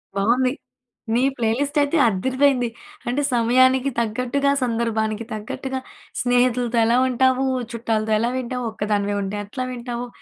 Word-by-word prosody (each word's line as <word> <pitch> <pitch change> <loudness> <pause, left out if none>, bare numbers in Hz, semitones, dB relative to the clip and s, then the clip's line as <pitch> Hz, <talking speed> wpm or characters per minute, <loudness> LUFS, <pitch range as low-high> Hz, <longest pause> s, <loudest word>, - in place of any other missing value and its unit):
బావుంది. 245 +6 +2 0.6
మీ 245 - +3
ప్లేలిస్ట్ 255 +6 0
అయితే 285 +3 +1
అద్దిరిపోయింది. 255 +4 +2 0.4
అంటే 260 +4 0
సమయానికి 255 +3 +4
తగ్గట్టుగా, 250 +5 0
సందర్భానికి 225 -2 -1
తగ్గట్టుగా 265 +4 -4 0.4
స్నేహితులతో 245 -1 +2
ఎలా 235 +2 +3
ఉంటావు? 260 +1 +2 0.3
చుట్టాలతో 220 -1 -1
ఎలా 235 - +1
వింటావు? 250 0 -3
ఒక్కదానివే 205 -1 -1
ఉంటే 195 +1 -3
ఎట్లా 255 +5 -4
వింటావు? 245 0 -5
245 Hz, 115 wpm, -22 LUFS, 225-260 Hz, 0.6 s, సమయానికి